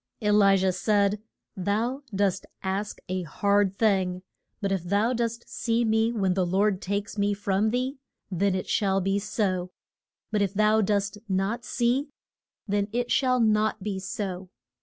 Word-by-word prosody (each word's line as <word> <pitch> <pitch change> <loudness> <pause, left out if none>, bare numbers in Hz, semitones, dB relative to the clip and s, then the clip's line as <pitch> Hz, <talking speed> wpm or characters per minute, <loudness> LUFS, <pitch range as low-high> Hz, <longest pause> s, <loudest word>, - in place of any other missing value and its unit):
E 210 -2 +1
li 200 -2 +5
jah 190 0 +2
said, 205 +2 +1 0.3
Thou 220 +8 -1
dost 195 -2 0 0.2
ask 195 +2 -2
a 185 0 -2
hard 200 +3 +1
thing. 185 -4 +1 0.4
But 200 -1 -1
if 190 -2 0
thou 205 +7 +1
dost 235 -1 -2
see 230 0 0
me 220 +1 +2
when 195 -5 +1
the 185 0 +1
Lord 190 +2 +1
takes 200 +2 -3
me 205 0 +2
from 200 +1 +1
thee, 255 +4 -2 0.3
then 190 +1 +1
it 185 - -3
shall 195 -2 +1
be 195 +1 0
so. 190 -3 -1 0.6
But 210 -1 +1
if 200 0 0
thou 215 +1 +4
dost 205 0 0
not 195 +5 0
see, 250 +4 0 0.6
then 200 0 0
it 245 +1 -1
shall 255 -2 +3
not 215 -2 +2
be 200 -2 -2
so. 185 -1 -5
205 Hz, 160 wpm, -26 LUFS, 190-220 Hz, 0.6 s, li